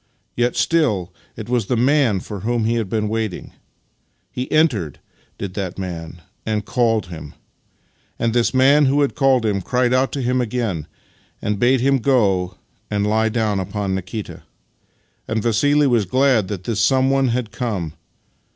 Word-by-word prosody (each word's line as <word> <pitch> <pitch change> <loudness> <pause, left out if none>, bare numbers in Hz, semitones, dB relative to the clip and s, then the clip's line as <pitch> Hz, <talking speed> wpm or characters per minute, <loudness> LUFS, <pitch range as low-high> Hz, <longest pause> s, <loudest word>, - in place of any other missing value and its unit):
Yet 120 0 +1
still 120 - +1 0.2
it 110 -1 -7
was 120 -4 0
the 125 - 0
Man 125 -5 +2
for 100 +1 -7
whom 115 +3 -1
he 115 - +1
had 115 -4 -1
been 105 0 -1
waiting. 110 -3 -3 0.8
He 125 +1 -5
entered 120 - +1 0.2
— - - -37
did 100 -2 -5
that 95 -2 -4
Man 85 -3 -6
— - - -44
and 105 -2 -2
called 115 -4 +1
him: 80 -5 -9 0.8
and 115 -1 0
this 120 -1 +2
Man 140 +3 +5
who 140 +2 +2
had 140 - +1
called 135 -4 +2
him 100 -2 0
cried 125 +4 +1
out 130 +1 +2
to 140 - -2
him 125 +1 +1
again 110 -10 -2 0.5
and 105 -1 -2
bade 125 +2 +3
him 135 +1 +3
go 100 -9 +1 0.3
and 105 -1 0
lie 110 +1 +2
down 110 -3 0
upon 100 +1 -3
Nikita. 95 +3 -5 0.9
And 110 -1 -1
Vassili 145 +6 +3
was 120 -6 +2
glad 130 -1 +2
that 95 -2 -5
this 110 +1 -2
Someone 135 +2 +3
had 120 -2 -2
come. 105 -10 -3
115 Hz, 170 wpm, -20 LUFS, 100-130 Hz, 0.9 s, Man